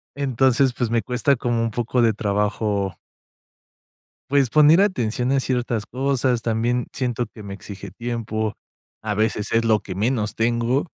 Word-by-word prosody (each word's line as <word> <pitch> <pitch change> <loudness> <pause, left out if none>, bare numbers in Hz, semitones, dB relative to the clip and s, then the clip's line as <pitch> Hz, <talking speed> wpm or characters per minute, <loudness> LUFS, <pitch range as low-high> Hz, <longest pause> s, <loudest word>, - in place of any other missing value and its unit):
Entonces, 135 -1 +2
pues, 120 -2 -2
me 115 -1 +1
cuesta 130 +3 +1
como 120 -1 -1
un 115 -1 -1
poco 120 +1 0
de 115 -2 +4
trabajo 100 -2 -1 1.3
pues, 135 -5 +2
poner 155 +3 +6
atención 125 - +1
a 135 - +3
ciertas 120 -4 -1
cosas, 130 -2 0
también 120 +2 0
siento 120 -2 -1
que 110 0 -13
me 100 -1 -7
exige 100 -1 -9
tiempo, 110 0 -3 0.5
a 105 -2 -2
veces, 110 -1 0
es 115 0 +2
lo 110 -2 +3
que 95 - -8
menos 110 0 -1
tengo, 120 +5 +1
115 Hz, 155 wpm, -22 LUFS, 110-125 Hz, 1.3 s, poner